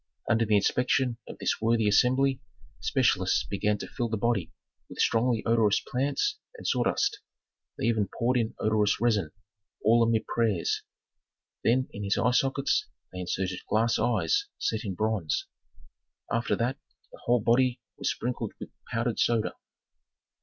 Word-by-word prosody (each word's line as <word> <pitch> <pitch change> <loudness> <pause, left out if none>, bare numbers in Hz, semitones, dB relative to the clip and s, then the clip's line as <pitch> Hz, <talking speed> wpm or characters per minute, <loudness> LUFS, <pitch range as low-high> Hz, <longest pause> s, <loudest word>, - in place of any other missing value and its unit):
Under 115 +1 +3
the 105 - +3
inspection 125 +3 +1
of - - -9
this - - -1
worthy 115 -1 +2
assembly, 130 +5 +3 0.4
specialists - - +2
began 105 +1 0
to - - -7
fill 120 -3 -3
the 110 - -1
body 100 -6 0 0.4
with - - -11
strongly 115 0 +2
odorous 110 -3 +3
plants 145 - -1 0.2
and - - -11
sawdust, 410 +1 +1 0.6
they - - -2
even 110 -3 +1
poured 125 +2 +2
in 115 -2 -1
odorous 105 -1 +1
resin, 105 -8 +1 0.5
all 115 +2 +5
amid 115 -1 +2
prayers. 110 -7 0 0.8
Then 130 +3 +2
in 105 - -6
his 100 0 0
eye 125 - +3
sockets 135 +2 +1 0.3
they 90 - -6
inserted 90 0 -2
glass 115 +2 +2
eyes 410 - +1
set 110 0 -1
in 100 -4 -4
bronze. 105 -6 -1 0.9
After 115 +1 +1
that 125 +4 -1 0.3
the - - -14
whole 120 +1 +3
body 125 +2 +2 0.2
was - - 0
sprinkled 125 +1 -3
with - - -8 0.2
powdered 115 0 -1
soda. 115 -2 +1
115 Hz, 145 wpm, -28 LUFS, 105-125 Hz, 0.9 s, all